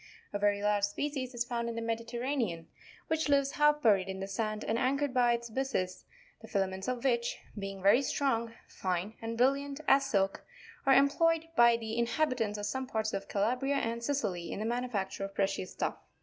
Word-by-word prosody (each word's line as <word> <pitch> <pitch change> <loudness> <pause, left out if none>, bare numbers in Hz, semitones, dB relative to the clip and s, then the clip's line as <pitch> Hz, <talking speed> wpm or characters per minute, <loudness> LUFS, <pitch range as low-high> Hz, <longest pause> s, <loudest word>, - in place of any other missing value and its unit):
A 205 - -1
very 205 0 +2
large 205 -1 +3
species 260 +3 -3
is 240 0 0
found 235 -1 -2
in 230 - -4
the 230 - -3
Mediterranean, 230 - -2 0.4
which 320 -1 0
lives 280 -1 +3
half 295 0 +3
buried 195 -4 +4
in 190 0 -4
the 195 - -4
sand, 215 +1 -2
and 225 +1 +1
anchored 275 +2 +1
by 245 -2 +4
its 235 0 -3
byssus, 240 -8 -2 0.4
the 225 - -11
fila 195 -3 +1
ments 190 0 -6
of 250 -2 -2
which, 235 -3 +1 0.2
being 195 -2 -6
very 205 +7 +6
strong, 235 -4 0 0.2
fine, 185 +3 -2
and 230 0 -4
brilliant 275 +3 +1
as 275 0 +6
silk, 195 -3 0 0.4
are 270 - +7
employed 330 +4 +3
by 235 -1 +6
the 225 0 -4
inhabitants 235 -4 0
of 205 - -4
some 260 +4 -3
parts 220 -2 -1
of 195 - -3
Calabria 250 +7 +1
and 235 -3 -1
Sicily 210 -11 -2
in - - -4
the 215 - -3
manufacture 230 -5 -2
of 195 - -9
precious 195 -1 -1
stuffs. - - -2
235 Hz, 190 wpm, -31 LUFS, 205-270 Hz, 0.4 s, are